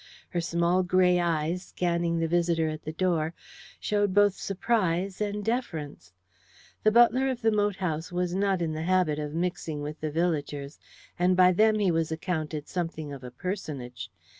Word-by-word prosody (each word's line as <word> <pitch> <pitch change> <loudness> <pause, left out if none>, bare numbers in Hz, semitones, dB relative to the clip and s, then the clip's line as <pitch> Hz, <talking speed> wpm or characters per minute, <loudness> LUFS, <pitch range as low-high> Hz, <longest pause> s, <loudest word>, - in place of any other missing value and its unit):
Her 175 - -1
small 170 +2 +1
grey 180 0 +3
eyes, 170 0 0
scanning 170 -2 -1
the 165 0 0
visitor 170 -1 +1
at 155 0 -5
the 155 - -3
door, 165 -1 0 0.4
showed 205 -2 0
both 205 -1 +5
surprise 195 -2 -1
and 205 0 -2
deference. 160 - -3 0.7
The 215 - +4
butler 240 +3 +5
of 250 -2 -4
the 225 - +4
moat 205 -1 +1
house 165 -3 -3
was 180 0 -1
not 195 -2 +1
in 160 -1 -1
the 155 - -4
habit 175 -3 +2
of 150 0 -4
mixing 165 -3 -2
with 150 +1 -6
the 155 - -1
villagers, 150 -3 -2 0.4
and 180 +1 +3
by 185 0 +7
them 215 +4 +4
he 200 -4 +2
was 165 -1 0
accounted 155 -2 -3
something 165 -4 -4
of 135 -2 -9
a 125 - -6
personage. 125 - -5
175 Hz, 170 wpm, -27 LUFS, 155-190 Hz, 0.7 s, by